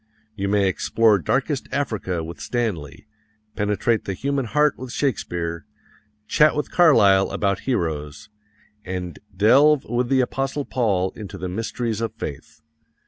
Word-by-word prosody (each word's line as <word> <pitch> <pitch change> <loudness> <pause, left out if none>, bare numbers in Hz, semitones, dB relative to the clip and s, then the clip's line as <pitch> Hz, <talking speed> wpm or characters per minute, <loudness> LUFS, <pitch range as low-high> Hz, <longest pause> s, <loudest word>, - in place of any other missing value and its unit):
You 100 -1 -2
may 100 -1 +2
explore 105 +2 +2
darkest 135 - -1
Africa 110 - -2
with 85 +2 -8
Stanley, 105 - -3 0.5
penetrate 105 +2 0
the 95 - -3
human 140 +3 -1
heart 150 +5 +2
with 130 -1 -8
Shakespeare, 85 - -2 0.6
chat 150 0 +4
with 150 - -3
Carlyle 100 - +5
about 100 -2 -1
heroes, 80 - -2 0.6
and 90 -1 -5 0.2
delve 135 +8 +5
with 120 +1 -1
the 135 -1 +3
Apostle 135 +3 -2
Paul 100 -7 0
into 100 -2 -9
the 90 0 -4
mysteries 115 +3 -3
of 115 -2 -3
faith. - - -8
110 Hz, 135 wpm, -22 LUFS, 95-130 Hz, 0.6 s, Carlyle